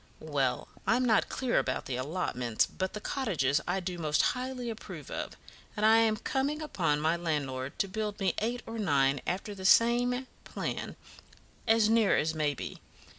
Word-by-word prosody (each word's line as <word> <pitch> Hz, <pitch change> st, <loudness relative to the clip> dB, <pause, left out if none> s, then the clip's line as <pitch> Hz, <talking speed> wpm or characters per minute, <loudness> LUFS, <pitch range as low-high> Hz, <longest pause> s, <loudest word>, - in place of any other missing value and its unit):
"Well, 135 Hz, -3 st, +1 dB, 0.2 s
I'm 250 Hz, +2 st, +3 dB
not 225 Hz, -3 st, +3 dB
clear 255 Hz, -2 st, +1 dB
about -, -, -2 dB
the 130 Hz, -, -3 dB
allotments; 125 Hz, -5 st, 0 dB
but 190 Hz, 0 st, -4 dB
the 210 Hz, -, -4 dB
cottages 175 Hz, -, 0 dB
I 180 Hz, +2 st, +1 dB
do 180 Hz, -1 st, -4 dB
most 155 Hz, -1 st, +2 dB
highly 250 Hz, -1 st, -4 dB
approve 220 Hz, -, -9 dB
of, -, -, -5 dB, 0.4 s
and 210 Hz, -, +2 dB
I 220 Hz, +1 st, +7 dB
am 225 Hz, -1 st, +3 dB
coming 275 Hz, +7 st, -1 dB
upon 165 Hz, -, 0 dB
my 160 Hz, +2 st, +2 dB
landlord 140 Hz, -6 st, -3 dB
to 195 Hz, -, +1 dB
build 210 Hz, +1 st, -3 dB
me 190 Hz, -3 st, +1 dB
eight 240 Hz, +3 st, -2 dB
or 225 Hz, 0 st, -6 dB
nine, 140 Hz, -7 st, +2 dB
after 190 Hz, +3 st, -2 dB
the 190 Hz, -2 st, -9 dB
same 245 Hz, +5 st, +4 dB, 0.2 s
plan, -, -, -4 dB, 0.7 s
as 225 Hz, -1 st, +5 dB
near 225 Hz, -2 st, +4 dB
as 160 Hz, +1 st, +1 dB
may 150 Hz, -2 st, 0 dB
be. -, -, -7 dB
195 Hz, 175 wpm, -30 LUFS, 150-230 Hz, 0.7 s, I